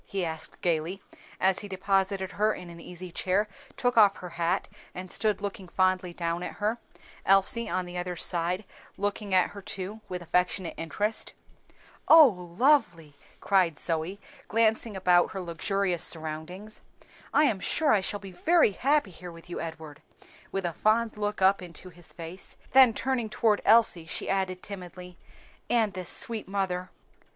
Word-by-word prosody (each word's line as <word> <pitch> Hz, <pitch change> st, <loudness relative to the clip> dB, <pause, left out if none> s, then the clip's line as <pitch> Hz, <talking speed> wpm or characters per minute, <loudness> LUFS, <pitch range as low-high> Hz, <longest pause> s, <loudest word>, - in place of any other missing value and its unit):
he 195 Hz, -3 st, -2 dB
asked 160 Hz, -1 st, -6 dB
gayly, 170 Hz, +2 st, 0 dB, 0.4 s
as 190 Hz, 0 st, +2 dB
he 205 Hz, -, -6 dB
deposited 195 Hz, 0 st, 0 dB
her 210 Hz, +3 st, +1 dB
in 175 Hz, -1 st, -9 dB
an 170 Hz, -, -11 dB
easy 180 Hz, +1 st, -9 dB
chair, 190 Hz, +5 st, 0 dB, 0.3 s
took 245 Hz, -1 st, 0 dB
off 205 Hz, -3 st, +7 dB
her 180 Hz, -, -8 dB
hat, 170 Hz, +2 st, -1 dB, 0.3 s
and 185 Hz, 0 st, -7 dB
stood 210 Hz, -3 st, 0 dB
looking 200 Hz, -2 st, -5 dB
fondly 185 Hz, 0 st, +1 dB
down 170 Hz, 0 st, -3 dB
at -, -, -5 dB
her, 215 Hz, +3 st, -2 dB, 0.4 s
Elsie 195 Hz, +4 st, +3 dB
on 185 Hz, +1 st, -1 dB
the 180 Hz, 0 st, -5 dB
other 180 Hz, 0 st, -4 dB
side, 175 Hz, +3 st, 0 dB, 0.3 s
looking 205 Hz, 0 st, -3 dB
at 185 Hz, -1 st, +3 dB
her 200 Hz, -, -9 dB
too 195 Hz, +3 st, -6 dB
with 180 Hz, -, -4 dB
affectionate 180 Hz, +1 st, 0 dB
interest. 210 Hz, +7 st, -2 dB, 0.7 s
"Oh, 320 Hz, -2 st, +10 dB, 0.3 s
lovely!" 180 Hz, -, +3 dB, 0.3 s
cried 185 Hz, -6 st, +2 dB
Zoe, 165 Hz, +5 st, -2 dB, 0.3 s
glancing 225 Hz, -1 st, +1 dB
about 180 Hz, -2 st, +4 dB
upon -, -, -11 dB
her 190 Hz, -, -4 dB
luxurious 180 Hz, +1 st, -1 dB
surroundings. 160 Hz, +6 st, -2 dB, 0.5 s
"I -, -, +4 dB
am 220 Hz, -10 st, +2 dB
sure 300 Hz, +9 st, +1 dB
I 205 Hz, -, +3 dB
shall 205 Hz, +2 st, -2 dB
be 195 Hz, -1 st, -10 dB
very 320 Hz, -, +3 dB
happy 275 Hz, 0 st, +1 dB
here 175 Hz, +1 st, -10 dB
with 165 Hz, +1 st, -13 dB
you, -, -, -4 dB
Edward," 160 Hz, -3 st, -8 dB, 0.5 s
with 195 Hz, -1 st, -2 dB
a 170 Hz, -, -2 dB
fond 220 Hz, +5 st, +1 dB
look 210 Hz, -2 st, -2 dB
up 195 Hz, +1 st, +4 dB
into 180 Hz, +1 st, -10 dB
his 175 Hz, 0 st, -11 dB
face; 170 Hz, +3 st, -9 dB, 0.2 s
then 255 Hz, -4 st, +7 dB
turning 255 Hz, -4 st, -1 dB
toward 215 Hz, -1 st, +1 dB
Elsie, 210 Hz, -7 st, +4 dB
she -, -, -4 dB
added 190 Hz, -1 st, -1 dB
timidly, 180 Hz, -2 st, -9 dB, 0.5 s
"and 225 Hz, -4 st, +2 dB
this 185 Hz, -1 st, -5 dB
sweet 225 Hz, -2 st, 0 dB
mother." 185 Hz, -2 st, -2 dB
190 Hz, 165 wpm, -28 LUFS, 175-210 Hz, 0.7 s, Oh